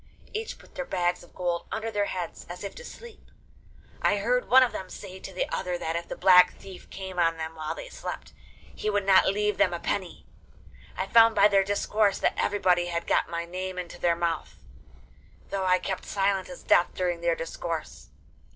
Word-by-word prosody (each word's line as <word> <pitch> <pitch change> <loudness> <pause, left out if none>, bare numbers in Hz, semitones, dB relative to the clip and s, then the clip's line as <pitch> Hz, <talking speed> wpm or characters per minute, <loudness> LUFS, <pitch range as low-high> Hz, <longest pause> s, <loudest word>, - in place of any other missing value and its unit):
Each 445 +1 -4
put - - -19
their 270 - -3
bags 180 -6 -1
of 175 - -18
gold 175 -1 -2
under 225 +1 -3
their 205 -1 +1
heads, 180 -3 -5
as 180 +2 -7
if 200 - -5
to - - -10
sleep. 475 -2 -12 0.7
I 205 - +3
heard 245 +5 0
one 260 +1 +8
of 250 - +1
them 185 - -6
say 190 -1 -9
to 190 - -8
the 185 - -2
other 180 -1 -2
that 165 -1 -3
if 170 0 -3
the - - -5
Black 180 -1 +6
Thief 190 -2 -12
came 190 -2 -6
on 165 -1 +2
them 160 0 -5
while 155 -1 -4
they - - -8
slept, - - -7 0.4
he 215 - -3
would 205 -1 0
not 195 -1 +6
leave 210 +2 0
them - - +3
a - - -5
penny. - - -3 0.7
I - - -1
found 230 -1 +6
by - - +7
their 195 -2 +4
discourse 205 0 +1
that - - +1
everybody 180 -4 +2
had 170 -1 -3
got - - +1
my 170 0 -3
name 185 +1 -5
into 180 -1 -6
their 170 -1 +3
mouth, 165 - -2 1.0
though 195 -1 -1
I 185 0 +4
kept 190 0 -4
silent 195 -1 0
as 270 - -10
death 175 - +3
during 175 -2 -1
their 170 -1 +2
discourse. 165 -1 -5
185 Hz, 205 wpm, -27 LUFS, 175-205 Hz, 1.0 s, one